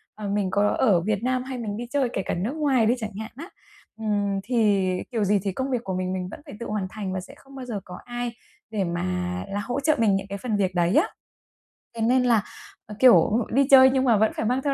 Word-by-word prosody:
ờ, 210 -1 -6
mình 200 -2 0
có 205 +2 +2
ở 200 -9 +3
Việt 210 +3 -1
Nam 255 0 0
hay 260 -1 -6
mình 210 -3 -4
đi 240 +1 -5
chơi 270 -3 +1
kể - - -1
cả - - -1
nước 190 +8 -2
ngoài 280 -7 +2
đi 225 - +4
chẳng 220 -3 -5
hạn 220 - -6
á, 330 +8 -9 0.5
ừm, 205 -2 0
thì 210 -4 +2 0.2
kiểu 225 -3 0
gì 205 +1 +2
thì 200 - -1
công 260 +8 -3
việc 245 -2 -1
của 190 - -4
mình 185 0 -2
mình 185 -1 -3
vẫn - - -9
phải - - -10
tự 235 - -5
hoàn 210 -3 -2
thành 195 -2 -5
và 190 - -2
sẽ 180 - -11
không 275 0 -17
bao 260 -1 -7
giờ 225 -5 -4
có 180 0 -9
ai 240 0 -4 0.4
để 215 -3 -1
mà 175 0 -2 0.4
là 200 +1 -2
hỗ 245 +6 -3
trợ 305 +2 +2
mình 215 -4 +3
những 195 0 -3
cái 200 0 -5
phần 220 +1 -2
việc 190 -2 0
đấy 175 +2 +2
á. 335 +8 +4 0.9
Thế 230 - -4
nên 250 +3 +3
là, 230 -4 +3 0.4
ờ, 210 - -9
kiểu, 240 -3 +5
đi 275 +2 +3
chơi 265 -1 +9
nhưng 260 0 +1
mà 235 -5 +4
vẫn 220 +1 +3
phải - - -2
mang 250 +4 +1
theo 280 0 0
220 Hz, 265 wpm, -24 LUFS, 200-250 Hz, 0.9 s, chơi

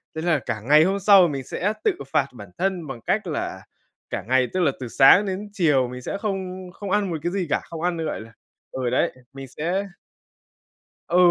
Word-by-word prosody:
Thế 160 - -3
là 165 -4 +2
cả 110 -3 -4
ngày 150 +6 +6
hôm 195 +3 +1
sau 195 -2 +7
mình 135 -3 -4
sẽ 205 - -2
tự - - +4 0.2
phạt 135 - +3
bản 105 -6 -11
thân 185 -4 -1
bằng 120 -4 -7
cách - - -1
là - - -4 0.4
cả 100 - -4
ngày, 130 0 +3
tức 185 - 0
là 155 -6 +3
từ 125 - -5
sáng 140 - +6
đến 200 +2 -4
chiều, 145 -9 +2
mình 125 +1 -8
sẽ 195 - -4
không 190 -3 -4
không 200 -2 -6
ăn 205 -2 +1
một 160 - -1
cái 175 - -1
gì 185 -4 -2
cả, - - +1
không 165 -1 -8
ăn 175 -1 0
nữa, 160 - -3
gọi - - -3
là 115 +1 -13 0.4
ừ 130 -2 -2
đấy, 125 - +1 0.2
mình 135 -1 -8
sẽ 175 +9 -2 1.3
Ừ, 175 - +2
165 Hz, 225 wpm, -23 LUFS, 130-190 Hz, 1.3 s, sau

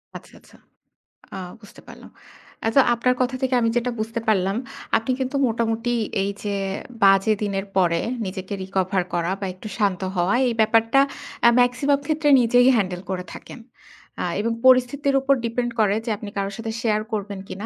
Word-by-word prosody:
আচ্ছা, - - -11
আচ্ছা। - - -21 0.8
আ - - -5 0.2
বুঝতে 205 - -15
পারলাম। - - -13 0.6
আচ্ছা 225 +5 +5
আপনার 250 +2 +1
কথা 255 +1 0
থেকে 260 -1 +1
আমি 230 - +2
যেটা 245 +1 -1
বুঝতে 225 +2 -3
পারলাম, 195 -2 +2 0.4
আপনি 225 +3 -2
কিন্তু 260 +1 -3
মোটামুটি 230 +1 -1 0.3
এই 200 - -1
যে 205 -1 -2 0.5
বাজে 195 +2 +5
দিনের 195 -1 -2
পরে 170 -3 +2 0.2
নিজেকে 190 +1 -6
রিকভার 190 0 -1
করা 175 +1 0
বা, 200 - -3
একটু 185 +4 -10
শান্ত 200 -4 0
হওয়া 180 +5 +1
এই 235 - 0
ব্যাপারটা 225 +4 +3 0.5
আ - - +9
মেক্সিমাম 275 +3 +2
ক্ষেত্রে 310 -1 +1
নিজেই 245 +2 +4
হ্যান্ডেল 185 -5 -1
করে 185 -1 -3
থাকেন। - - -11 0.6
অ্যা - - -2
এবং 230 +3 0
পরিস্থিতির 260 +2 +4
উপর 275 +1 +3
ডিপেন্ড 240 +1 -2
করে 205 -2 +3
যে, - - -3
আপনি 210 -1 -8
কারো 195 0 -1
সাথে 225 0 -4
শেয়ার 215 -2 +1
করবেন 200 -2 -3
কিনা। 200 +3 -7
220 Hz, 170 wpm, -22 LUFS, 195-245 Hz, 0.8 s, আ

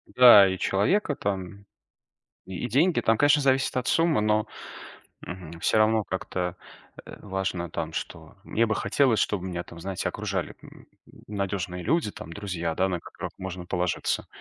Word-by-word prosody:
Да, 120 -6 +9
и 95 0 -2
человека 145 - +1
там, 100 -1 -4 0.8
и 95 +5 -4
деньги. 160 +8 +3
Там, 115 -1 +2
конечно, 145 0 +4
зависит 135 -1 +2
от 130 -1 -1
суммы, 165 -7 +3
но, 105 0 +2 0.8
мгм, 85 -2 -9
всё - - +2
равно 110 0 +3
как-то, 90 -2 -4 0.5
э, - - -10
важно 95 -3 -3
там 80 0 -4
что. 80 +3 -7
Мне 115 - +1
бы 110 -1 -1
хотелось, 130 -6 +2
чтобы 95 -3 0
меня 85 -1 -4
там, 85 - -12
знаете, 95 +1 -3
окружали, - - -3
м, - - -15 0.4
надёжные 100 -3 -3
люди, 165 - +1
там 85 - -9
друзья, 85 -5 -3
да, 95 +3 +1
на 90 -2 -2
которых - - -8
можно 90 -1 -6
положиться. 90 0 -1
95 Hz, 160 wpm, -26 LUFS, 90-110 Hz, 0.8 s, Да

